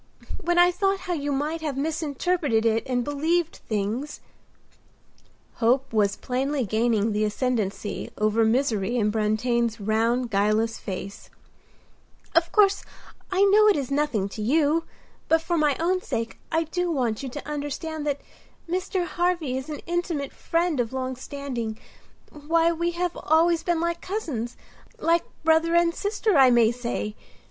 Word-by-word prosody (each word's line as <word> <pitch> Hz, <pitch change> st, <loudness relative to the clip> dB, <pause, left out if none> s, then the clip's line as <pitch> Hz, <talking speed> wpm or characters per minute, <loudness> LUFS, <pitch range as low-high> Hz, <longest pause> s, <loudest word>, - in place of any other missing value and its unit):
When 350 Hz, 0 st, +1 dB
I 350 Hz, 0 st, +6 dB
thought 390 Hz, +1 st, 0 dB
how 360 Hz, -, -3 dB
you 290 Hz, -3 st, -2 dB
might 300 Hz, +4 st, -1 dB
have 295 Hz, -4 st, -3 dB
misinterpreted 300 Hz, -4 st, 0 dB
it, 225 Hz, 0 st, +3 dB
and 250 Hz, -1 st, 0 dB
believed 320 Hz, +5 st, 0 dB
things"—hope 235 Hz, +2 st, -4 dB
was 200 Hz, -2 st, +2 dB
plainly 265 Hz, +1 st, -1 dB
gaining 220 Hz, +1 st, +1 dB
the 210 Hz, +1 st, 0 dB
ascendancy 215 Hz, -2 st, -2 dB
over 215 Hz, +2 st, +2 dB
misery 230 Hz, -2 st, +1 dB
in 210 Hz, -2 st, +2 dB
Brantain's 225 Hz, +2 st, 0 dB
round, 230 Hz, +4 st, 0 dB
guileless 215 Hz, +3 st, +1 dB
face—"Of 200 Hz, -, -6 dB
course, 400 Hz, -2 st, +4 dB, 0.5 s
I 380 Hz, +1 st, +3 dB
know 415 Hz, +2 st, +6 dB
it 415 Hz, -, +5 dB
is 280 Hz, -2 st, -3 dB
nothing 275 Hz, -9 st, 0 dB
to 215 Hz, -, -7 dB
you, 305 Hz, +7 st, +2 dB, 0.4 s
but 325 Hz, -, +4 dB
for 345 Hz, +1 st, -1 dB
my 300 Hz, -3 st, +2 dB
own 365 Hz, +3 st, +1 dB
sake 230 Hz, -8 st, -4 dB
I 325 Hz, 0 st, +2 dB
do 355 Hz, +3 st, -2 dB
want 245 Hz, -9 st, 0 dB
you 270 Hz, -, -5 dB
to 290 Hz, +4 st, -8 dB
understand 300 Hz, +1 st, -4 dB
that 285 Hz, -1 st, -1 dB, 0.5 s
Mr. 365 Hz, +1 st, -1 dB
Harvy 345 Hz, -6 st, -1 dB
is 265 Hz, +3 st, -5 dB
an 300 Hz, -, -5 dB
intimate 340 Hz, -5 st, -2 dB
friend 335 Hz, -3 st, 0 dB
of 240 Hz, 0 st, -1 dB
long 260 Hz, 0 st, -2 dB
standing. 250 Hz, -5 st, -5 dB, 0.5 s
Why, 325 Hz, +3 st, +1 dB
we 340 Hz, +1 st, -1 dB
have 355 Hz, -1 st, -1 dB
always 330 Hz, +2 st, +3 dB
been 345 Hz, -2 st, 0 dB
like 340 Hz, 0 st, -1 dB
cousins—like 330 Hz, -, -3 dB, 0.2 s
brother 320 Hz, +1 st, +3 dB
and 340 Hz, 0 st, +4 dB
sister, 410 Hz, -3 st, +1 dB
I 260 Hz, -1 st, +8 dB
may 235 Hz, -2 st, +5 dB
say. 235 Hz, -3 st, -3 dB
285 Hz, 145 wpm, -25 LUFS, 230-335 Hz, 0.5 s, I